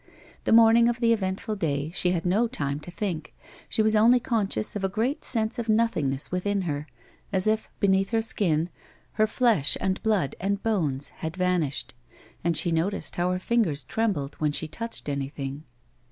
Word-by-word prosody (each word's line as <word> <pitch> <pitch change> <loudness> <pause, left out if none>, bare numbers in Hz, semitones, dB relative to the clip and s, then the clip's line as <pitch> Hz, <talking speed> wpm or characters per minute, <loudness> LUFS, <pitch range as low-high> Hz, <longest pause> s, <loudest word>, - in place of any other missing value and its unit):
The - - +1
morning 230 +1 +7
of 240 0 -2
the 230 -1 +4
eventful 205 +1 -2
day 150 -3 -1
she 180 - +1
had 175 -1 -1
no 205 +7 +2
time 140 -8 -3
to 150 - -10
think; 170 -3 -4 0.3
she 220 - +1
was 215 0 +3
only 235 +4 +6
conscious 210 - -1
of 205 - -3
a 195 - +1
great 225 +9 -1
sense 225 -1 0
of 230 -1 -4
nothingness 160 -12 +1
within 195 +2 0
her, 150 -3 -3 0.4
as 190 -1 +1
if 220 0 0
beneath 195 -1 +2
her 225 -1 +1
skin, 175 -6 +2 0.4
her 215 0 +2
flesh, 220 - +2
and 190 0 -1
blood, 200 - +1
and 200 +1 -1
bones 155 -11 -1
had 160 +3 -6
vanished, 180 -6 0 0.5
and 170 -1 +1
she 170 +2 0
noticed 170 +5 -1
how 175 +1 +1
her 180 - 0
fingers 185 - 0
trembled 150 - -1
when 150 -1 +1
she 155 +2 -3
touched 230 +6 -5
anything. 140 +1 -4
190 Hz, 180 wpm, -26 LUFS, 155-220 Hz, 0.5 s, morning